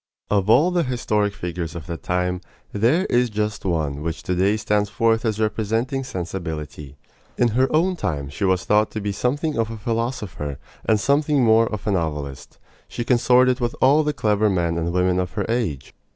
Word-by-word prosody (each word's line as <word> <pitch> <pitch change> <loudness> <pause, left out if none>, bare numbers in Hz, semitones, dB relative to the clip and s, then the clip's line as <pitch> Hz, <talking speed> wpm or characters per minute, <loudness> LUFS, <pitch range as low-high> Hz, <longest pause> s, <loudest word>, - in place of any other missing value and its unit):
Of 100 -1 +1
all 150 +11 +5
the 175 -1 +2
historic 110 -7 0
figures 85 -1 -5
of 80 -4 -7
that 85 -3 -6
time, 90 +2 -1 0.3
there 125 - +2
is 125 -5 +2
just 105 -1 -3
one 75 -5 -1
which 80 +1 -4
to 90 - -1
day 95 +4 +2
stands 105 -1 0
forth 115 +1 +1
as 110 -1 -1
representing 110 +5 -1
sensibility. 80 - -6 0.4
In 120 - +3
her 130 +4 +2
own 175 +4 +2
time 70 - -3
she 70 +8 -6
was 95 -3 +1
thought 105 +2 +3
to 110 - -2
be 100 0 -2
something 140 +6 -1
of 115 -1 0
a 115 - -6
philosopher, 110 - -3 0.3
and 110 -1 +3
something 145 +2 +2
more 115 0 +5
of 105 -2 -5
a 105 - +1
novelist. 75 -7 -3 0.3
She 120 - -4
consorted 125 +1 +3
with 120 -1 -1
all 140 +4 +5
the 150 -1 0
clever 105 -5 +1
men 85 -3 0
and 85 0 -1
women 90 0 +1
of 90 -3 -3
her - - -2
age. 110 - -2
105 Hz, 190 wpm, -22 LUFS, 90-120 Hz, 0.4 s, all